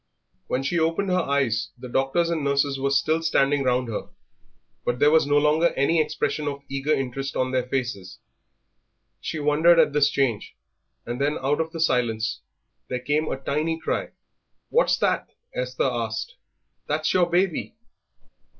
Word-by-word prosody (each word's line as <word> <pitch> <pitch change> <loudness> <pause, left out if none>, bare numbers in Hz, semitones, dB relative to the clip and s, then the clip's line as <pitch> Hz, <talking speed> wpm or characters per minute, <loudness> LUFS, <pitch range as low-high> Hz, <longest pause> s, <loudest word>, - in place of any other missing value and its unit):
When 130 - -1
she 170 +5 0
opened 165 +5 0
her 180 - +3
eyes 135 -7 0
the 125 - -8
doctors 135 +7 +1
and 160 -3 -1
nurses 140 0 +1
were 140 +1 0
still 155 +4 +2
standing 145 -3 +2
round 125 -1 +1
her, 110 - -5 0.7
but 120 - -1
there 145 +4 +4
was 160 -2 +4
no 145 0 +3
longer 150 +3 +3
any 155 +4 +3
expression 150 0 -2
of 140 -1 -4
eager 135 +2 -2
interest 135 -1 -2
on 130 0 0
their 130 -1 0
faces. 120 -9 -3 1.0
She - - -4
wondered 155 +3 +4
at 150 - +4
this 145 0 +4
change, 130 -8 -1 0.5
and 120 +3 -4
then 145 +2 +1
out 145 +4 +1
of 160 0 -4
the 165 - -6
silence 120 - 0 0.5
there 125 - -2
came 145 +5 -1
a - - -2
tiny 155 +4 -1
cry. - - -2 0.6
"What's - - +3
that?" - - 0 0.2
Esther - - -2
asked. 475 - -2 0.5
"That's - - 0
your 175 -2 +3
baby." 180 +3 0
145 Hz, 160 wpm, -24 LUFS, 130-160 Hz, 1.0 s, there